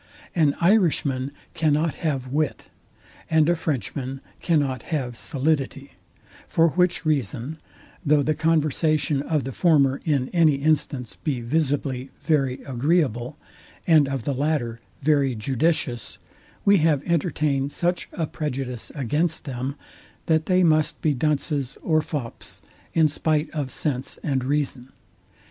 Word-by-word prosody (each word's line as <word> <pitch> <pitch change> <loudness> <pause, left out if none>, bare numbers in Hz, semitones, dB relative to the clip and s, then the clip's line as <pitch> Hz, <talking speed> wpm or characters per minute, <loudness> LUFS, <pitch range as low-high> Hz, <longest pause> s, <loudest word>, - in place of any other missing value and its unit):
An 150 -4 +3
IRISHMAN 155 -8 +2 0.2
cannot 155 0 +1
have 135 -6 -1
wit, 150 0 -2 0.6
and 160 -1 +4
a 175 - +3
Frenchman 135 -3 -3 0.2
cannot 140 -7 +1
have 130 -7 -2
solidity; 140 0 -1 0.6
for 165 0 +3
which 180 -1 +1
reason, 140 0 -1 0.4
though 150 -2 +3
the 155 - +1
conversation 155 -2 +1
of 150 -1 0
the 135 - -4
former 140 -3 +3
in 140 -5 0
any 160 -4 +4
instance 140 -4 0
be 145 -6 -2
visibly 135 -1 -1
very 135 -5 0
agreeable, 135 -1 0 0.5
and 155 -5 +5
of 135 -3 -3
the 140 - -1
latter 130 -4 -1 0.2
very 140 -3 +3
judicious, 130 +1 -1 0.5
we 200 0 +6
have 155 -3 +2
entertained 150 -5 0
such 175 +3 -1
a 165 - -1
prejudice 135 -6 -4
against 150 +5 0
them, 130 0 -4 0.5
that 160 -1 +2
they 185 0 +4
must 155 -2 +2
be 155 - +3
dunces 140 -1 -1
or 155 -2 +3
fops 145 -6 -5 0.3
in 160 -2 +5
spite 155 +1 0
of 145 -4 -3
sense 130 -2 -2
and 135 -4 0
reason. 135 -2 -2
145 Hz, 125 wpm, -24 LUFS, 135-160 Hz, 0.6 s, we